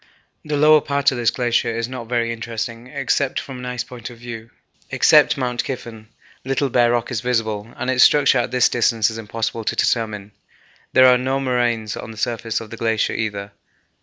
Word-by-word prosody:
The 150 -1 -2
lower 155 +1 +6
part 140 0 +1
of 130 - -4
this 120 - +3
glacier 120 -2 0
is 115 0 -2
not 125 -2 -8
very 115 -1 0
interesting, 115 +1 -5
except 135 +1 -1
from 130 -2 -8
an 125 - -6
ice 125 -1 -3
point 120 -2 -9
of 120 - -13
view. 115 -1 -9 0.4
Except - - +4
Mount 125 -2 -1
Kyffen, 115 -4 -7 0.4
little 135 +1 -1
bare 120 -1 +3
rock 120 +1 -1
is 115 -3 -2
visible, 115 -3 -2
and 130 - -5
its 130 -1 +4
structure 145 -4 +5
at 120 - -1
this 125 -1 +3
distance 115 -2 +1
is 110 - -7
impossible 115 +1 -4
to - - -1
determine. 105 -3 -1 0.6
There 130 - +7
are 125 -1 +6
no 130 +2 -1
moraines 120 -5 -1
on - - -8
the 110 - -10
surface 115 0 -2
of 110 -2 -10
the 115 - -7
glacier 110 -1 0
either. 105 -2 -4
120 Hz, 195 wpm, -20 LUFS, 115-125 Hz, 0.6 s, There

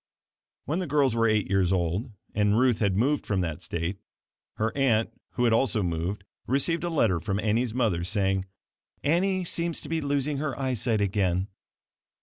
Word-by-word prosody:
When 155 +6 -1
the 185 - -2
girls 140 -4 +2
were 115 0 +2
eight 110 -2 +2
years 95 -2 +2
old 90 +5 0 0.2
and 105 0 +2
Ruth 125 -2 +3
had 100 -3 +1
moved 140 +6 +2
from 100 -3 0
that 80 -4 -3
state, 85 +3 -3 0.6
her 110 +1 -1
aunt 115 -5 +2 0.2
(who 125 - 0
had 115 -2 +4
also 115 -3 +2
moved) 90 +4 -2 0.2
received 150 +7 +1
a 175 - -1
letter 115 - +2
from 95 +4 -2
Annie's 110 +2 0
mother, 105 -10 +1
saying, 95 0 0 0.6
"Annie 185 +5 +2
seems 170 -1 -1
to - - -8
be 165 0 0
losing 145 0 0
her 140 -3 -3
eyesight 125 -4 0
again." 95 -1 0
110 Hz, 170 wpm, -27 LUFS, 95-140 Hz, 0.6 s, had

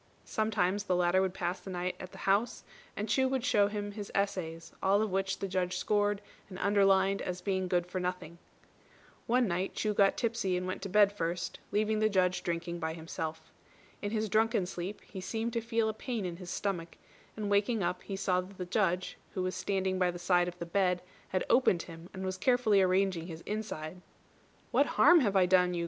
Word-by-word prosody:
Sometimes 205 -2 0
the 185 - +1
latter 180 +1 +3
would 190 -1 -1
pass 175 +1 -2
the - - -10
night 180 0 -2
at 185 - -8
the - - -12
house, 205 +5 +1 0.3
and 210 - -2
Chu 260 +5 +3
would 260 -2 -1
show 205 -4 +4
him 205 0 -4
his 205 -1 -7
essays, 170 -5 -2
all 195 +1 +4
of 215 - -2
which 195 +1 0
the 195 - -3
Judge 185 -1 -1
scored 205 -1 +1 0.3
and 185 - -8
underlined 195 -1 +3
as 180 0 -3
being 190 0 -1
good 175 -1 +1
for 180 +1 -4
nothing. 180 -2 -4 0.9
One 245 0 +3
night 185 +1 -2
Chu 215 -1 0
got 200 -1 +4
tipsy 225 -6 0
and 180 - -3
went 185 +1 -4
to 195 - -5
bed 205 +1 +5
first, 170 -3 -3
leaving 215 +1 +1
the 215 0 +3
Judge 185 -2 +2
drinking 170 0 -3
by 160 -1 -2
himself. 160 -1 -6 0.5
In 205 - -2
his 220 0 -1
drunken 220 -1 +2
sleep 180 +3 -5
he 190 - -8
seemed 225 +4 -3
to 230 - 0
feel 230 -1 0
a 220 - -1
pain 225 -2 -4
in 175 -1 -4
his 180 -1 -9
stomach, 175 -5 -3 0.4
and 210 -1 -2
waking 205 +1 +2
up 180 +1 -1
he 195 - -5
saw 185 -1 +1
that 190 +1 -12
the 180 - -4
Judge, 185 -1 0 0.2
who 185 - -1
was 185 0 -1
standing 190 0 -1
by 180 -1 +3
the 175 - -4
side 175 0 +2
of 180 0 -6
the 170 - -5
bed, 180 0 +1 0.2
had 185 - -1
opened 195 -9 +4
him, 165 +1 -11
and 190 0 -6
was 185 0 -3
carefully 220 -2 +4
arranging 185 -2 +2
his 165 -2 -8
inside. 180 -6 -5 0.7
"What - - +4
harm 350 -1 +8
have 205 -8 +1
I 190 -1 +6
done 180 -1 +3
you?" - - -1
190 Hz, 210 wpm, -31 LUFS, 180-205 Hz, 0.9 s, harm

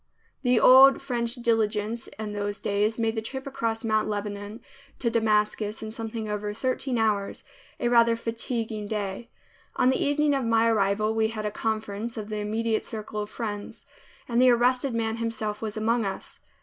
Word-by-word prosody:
The 250 -3 +3
old 265 +1 +8
French 240 -3 -1
diligence 225 -2 0
in 215 -1 -5
those 205 0 -3
days 210 +2 0
made 225 -1 0
the 220 - -2
trip 265 +4 -6
across 230 -5 -2
Mount 215 -1 +1
Lebanon 205 +1 -4 0.4
to 235 - 0
Damascus 215 -1 +1
in 215 - -5
something 225 0 -5
over 210 0 -3
thirteen 255 +1 -1
hours, 210 -3 0 0.4
a - - 0
rather 235 -1 +5
fatiguing 230 -2 -3
day. 205 +2 -4 0.5
On 255 - +4
the - - +1
evening 290 0 +2
of 270 -1 0
my 230 0 +3
arrival 215 0 +2
we 220 0 +2
had 220 -1 -5
a 210 - -1
conference 220 +1 -3
of 215 -1 -5
the 215 - -3
immediate 220 +2 -1
circle 215 -1 -5
of 210 - -5
friends, 210 -3 -6 0.4
and 240 0 +2
the 255 - +7
arrested 250 +1 +2
man 225 0 -1
himself 220 -2 -3
was 220 -1 -4
among 225 +2 +1
us. 195 -1 -5
225 Hz, 175 wpm, -26 LUFS, 210-235 Hz, 0.5 s, old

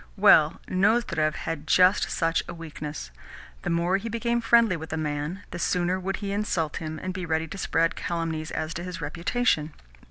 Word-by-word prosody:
Well, 180 -6 +6
Nozdrev 185 -6 +2
had 160 -2 -5
just 185 +2 +4
such 165 -1 +1
a 170 - -6
weakness. 155 - -7 0.5
The - - -3
more 175 +2 +2
he 220 +4 -5
became 235 +1 0
friendly 230 -4 +4
with 160 -1 -7
a 160 - -2
man, 150 +4 -3
the 175 - -5
sooner 180 +1 +1
would 195 +1 -2
he 200 -1 -4
insult 185 -7 -1
him, 155 -1 -5
and 185 0 -3
be 185 -1 -5
ready 160 -1 -1
to - - -7
spread 165 -2 +1
calumnies 165 -2 -3
as 155 +1 -3
to 175 - -5
his 180 -1 -6
reputation. 165 +1 0
170 Hz, 185 wpm, -26 LUFS, 160-195 Hz, 0.5 s, Well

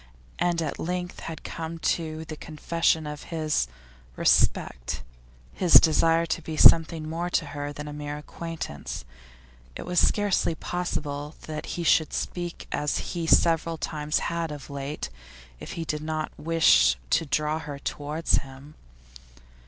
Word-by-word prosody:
And 170 -2 +1
at 150 - -4
length 180 +1 -3
had 165 -1 -7
come 165 0 -5
the 160 -1 -2
confession 160 0 0
of 150 0 -6
his 155 - 0 0.5
'respect,' - - +2 0.5
his 180 -3 0
desire 165 +1 +6
to 165 +1 -2
be 155 -1 -6
something 160 -1 +6
more 170 +2 -2
to 165 - +1
her 145 0 -4
than 150 0 -7
a 150 - -6
mere 145 0 -5
acquaintance. 150 - -6 0.7
It - - -5
was 180 0 +2
scarcely 205 -5 +2
possible 150 -4 -3
that 155 -1 -5
he 170 - -2
should 160 -1 +3
speak 175 -1 -4
as 150 0 -1
he 170 -2 -2
several 165 0 +4
times 150 -1 -1 0.2
had 165 -2 -2
of 145 -1 -8
late 140 - -4 0.5
if - - -7
he 165 - -4
did 150 -1 -2
not 155 0 -3
wish 165 +1 +4
to 165 - +3
draw 150 +2 0
her 145 -3 -6
towards 150 +3 -1
him. 135 +2 -12
160 Hz, 145 wpm, -26 LUFS, 150-165 Hz, 0.7 s, desire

